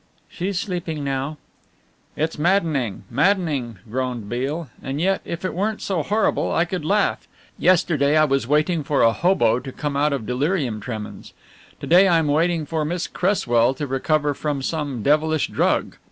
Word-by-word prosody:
"She's 185 +1 -3
sleeping 175 -7 -4
now." 140 +2 -2 0.8
"It's 160 0 -2
maddening, 155 - +1
maddening," 145 - +1
groaned 125 -2 -3
Beale, 140 +7 -3
"and 135 +2 -4
yet 190 +3 +1
if 170 +2 -5
it - - -2
weren't 210 +4 -1
so 185 -5 -1
horrible 210 +8 0
I 165 - +2
could 180 -1 -4
laugh. 205 +6 +1 0.3
Yesterday 155 -5 +3
I 155 - +5
was 135 -4 0
waiting 155 +3 +1
for 145 0 +1
a 115 0 +5
'hobo' 170 -10 +2
to 130 +1 -8
come 145 +1 -4
out 145 +2 +2
of 135 -6 -2
delirium 130 - -1
tremens. 110 -2 -7 0.5
To - - -4
day 180 +4 +6
I 170 -3 +4
am 160 -2 +1
waiting 165 +2 +1
for 160 0 -2
Miss 170 +3 -2
Cresswell 130 - +1
to 145 - -3
recover 145 +2 0
from 145 -1 -3
some 145 -7 -3
devilish 155 +1 +2
drug. - - 0
150 Hz, 170 wpm, -22 LUFS, 135-175 Hz, 0.8 s, day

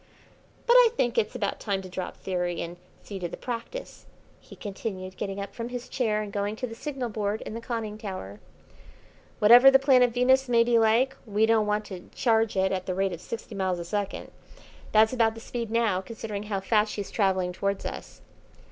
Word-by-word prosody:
"But 475 - +5
I - - +8
think 240 -1 +1
it's 215 +3 -2
about 205 -5 -2
time 195 -3 -2
to - - -8
drop 185 0 -6
theory 180 -2 -2
and 170 +1 -8 0.3
see 200 -2 -7
to 175 -2 -3
the - - -7
practice," 245 - -7 0.3
he - - -14
continued, 190 -2 -6
getting 195 -1 -4
up 200 - -6
from 235 0 -5
his 245 0 -6
chair 215 -4 0
and 205 -1 -8
going 205 +1 -1
to 250 - -4
the 225 - -7
signal 265 +1 -4
board 210 0 -2
in - - -7
the 230 - -5
conning 225 -3 -4
tower. 185 - -7 1.0
"Whatever 240 +5 +8
the 270 - +7
planet 260 -2 +5
Venus 260 +2 +3
may 235 -1 +5
be 235 -1 +3
like, 230 +4 +3
we 210 +1 +2
don't 220 -1 +3
want 210 0 0
to 185 -2 -9
charge 225 -4 +2
it 190 0 +2
at 185 -1 -3
the 185 - -1
rate 195 0 0
of 170 - -7
sixty 230 +3 -7
miles 190 -2 -1
a 170 - -6
second. 200 +2 -4 0.6
That's 220 +2 +5
about 225 -3 +2
the - - -8
speed 230 0 -5
now, 225 -5 +1
considering 215 0 -6
how 195 -2 -1
fast 210 +1 +2
she's 205 -2 -5
travelling 190 -3 +1
towards 200 +1 -2
us." - - -7
215 Hz, 205 wpm, -27 LUFS, 195-235 Hz, 1.0 s, I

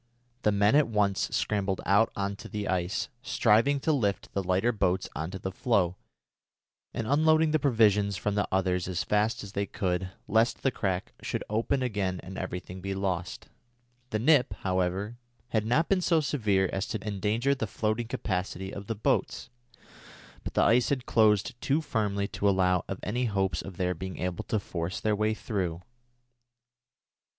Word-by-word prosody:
The 105 - +3
men 100 +4 +3
at 150 -1 +5
once 105 -3 +1
scrambled 100 -2 -1
out 100 +3 +4
on 100 0 -2
to - - -10
the 105 -2 -3
ice, 90 0 -1
striving 120 +6 +3
to 160 - +1
lift 105 -8 -1
the 100 - 0
lighter 95 +6 +1
boats 95 -4 0
on 80 +1 -3
to 95 - -6
the 95 0 -4
floe 95 -4 +1 1.0
and 115 - -3
unloading 155 +4 +4
the 155 - +3
provisions 105 -7 +3
from 105 +3 -1
the 105 -1 0
others 90 -2 +1
as 90 -2 -1
fast 105 +2 +1
as 100 - -8
they 100 0 -2
could, 90 -1 -2 0.2
lest 110 +3 +2
the 135 - +3
crack 95 -5 -2
should - - -3
open 120 +5 +1
again 100 -6 -1
and 95 +2 -8
everything 90 0 -6
be 95 +1 -3
lost. 95 -2 -3 0.6
The 110 - 0
nip, 125 -3 +3
however, 95 +4 -1 0.3
had 110 -2 0
not 150 +8 +2
been 195 -2 +2
so 170 -2 +3
severe 105 -10 +1
as 95 0 -1
to 110 -1 -5
endanger 105 +6 +1
the 120 -5 -3
floating 110 +3 -1
capacity 95 -3 -3
of 100 0 -7
the 115 - -2
boats, 105 - -1 0.9
but - - -6
the - - +4
ice 120 +1 +4
had 130 -3 -1
closed 105 -3 +3
too 140 +3 +2
firmly 105 -9 -1
to 100 - +1
allow 90 -2 +2
of 95 - -4
any 120 +5 -1
hopes 95 -4 0
of 95 -3 -9
their 90 0 0
being 95 +2 -6
able 90 -1 -3
to 110 - 0
force 85 -1 -4
their 110 -1 +1
way 110 +1 +1
through. 90 -7 -3
100 Hz, 175 wpm, -28 LUFS, 95-115 Hz, 1.0 s, at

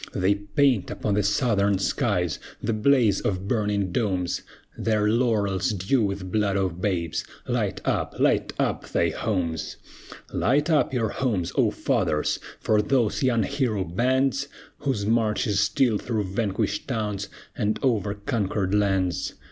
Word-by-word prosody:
They 95 +2 +2
paint 105 +2 +1
upon 105 - -2
the 105 - +2
Southern 100 -1 +2
skies 95 - 0 0.2
The 115 - -1
blaze 110 -3 +3
of 95 -1 -2
burning 105 -4 0
domes, 95 -4 -1 0.3
Their 105 -2 +1
laurels 105 -3 +1
dew 100 +7 +1
with 100 -3 -2
blood 100 -2 +1
of 90 -2 -1
babes! 85 -5 -1 0.2
Light - - -1
up, - - -1
light - - +2
up - - -1
thy 85 - +2
homes! 85 -4 -2 0.6
Light 145 +7 +2
up 150 -3 +3
your 115 -4 0
homes, 100 -7 -1
O - - +4
fathers! 75 0 0 0.2
For 105 -1 +2
those 125 -1 +1
young 120 -4 +2
hero 125 -8 0
bands, 130 +9 +1 0.3
Whose 120 -8 -1
march 110 -1 +1
is 100 -2 +1
still 105 +2 +2
through 110 -4 -2
vanquished 105 -1 -1
towns, 105 -5 -2 0.3
And 105 -1 0
over 105 -6 +1
conquered 100 -2 -1
lands! 95 -4 +1
105 Hz, 140 wpm, -25 LUFS, 95-120 Hz, 0.6 s, O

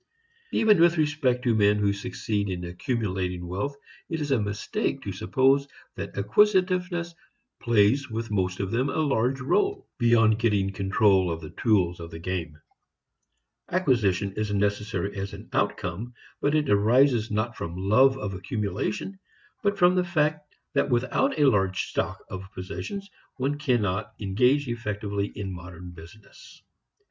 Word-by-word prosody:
Even 210 -6 +4
with 170 0 +5
respect 145 -5 +1
to 120 -3 +2
men 105 -1 +4
who 100 -1 +2
succeed 100 0 -3
in 90 -1 -4
accumulating 90 -3 -2
wealth 100 +11 -3 0.3
it 165 - -2
is 145 -2 -3
a 130 -5 +3
mistake 100 0 -2
to - - -4
suppose 135 +2 +2 0.3
that - - -7
acquisitiveness 180 - +2 0.5
plays 120 +4 +3
with 110 -1 -4
most 90 -2 -1
of 95 -1 -2
them 130 +4 +1
a - - -3
large 135 -4 +1
rôle, 395 - 0
beyond 115 -2 +4
getting 100 -4 +1
control 95 -1 +3
of 80 -1 -3
the 80 -2 -9
tools 95 -6 +1
of 85 -1 -7
the 80 - -8
game. 85 -2 -4 1.1
Acquisition 110 - +1
is 105 0 -2
necessary 105 0 -1
as 100 0 -4
an - - -10
outcome, 110 +8 -2 0.3
but 145 +2 +2
it 150 -2 +1
arises 115 +3 +3
not 110 +3 -1
from 85 0 -5
love 125 +8 +4
of 100 -6 -4
accumulation 105 - -3 0.4
but 200 -1 0
from 180 -1 +5
the 180 0 +2
fact 150 -3 -1 0.2
that 140 0 +1
without 125 +4 +1
a 145 - +4
large 95 -6 +2
stock - - -3
of 95 +1 -8
possessions 195 - -6 0.3
one 135 +2 0
cannot 110 -8 0
engage 125 +8 +2
effectively 105 -3 -3
in 100 -2 -4
modern 90 0 -9
business. 85 +5 -15
110 Hz, 150 wpm, -26 LUFS, 95-140 Hz, 1.1 s, with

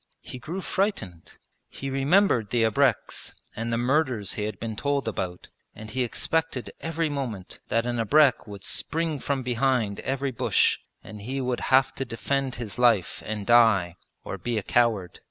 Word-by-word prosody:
He 125 - -8
grew 170 +9 -5
frightened. 110 - -2 0.4
He 135 0 -6
remembered 135 - +3
the 120 -2 +2
abreks 110 -1 +1 0.2
and 115 +1 -3
the 115 - +1
murders 125 -4 0
he 105 -3 -2
had 105 -3 -5
been 115 -1 -4
told 140 +2 -1
about, 90 -5 -4 0.3
and 110 0 -9
he 130 +2 0
expected 155 +2 -1
every 165 0 -1
moment 125 -10 -5
that 115 +1 +1
an 120 -1 -1
abrek 140 +3 +4
would 100 -2 -9
spring 160 -1 -1
from 135 -1 -2
behind 125 -4 0
every 135 0 -2
bush 120 - +2 0.2
and 105 -1 -10
he 130 +6 -3
would 125 -2 -1
have 130 0 +4
to 135 - -3
defend 135 +2 -2
his 115 -2 -6
life 115 -7 +3
and 105 -2 -3
die, 110 -7 +5 0.3
or - - -6
be 120 -2 -2
a 105 - -1
coward. 110 -7 +1
120 Hz, 170 wpm, -26 LUFS, 110-135 Hz, 0.4 s, die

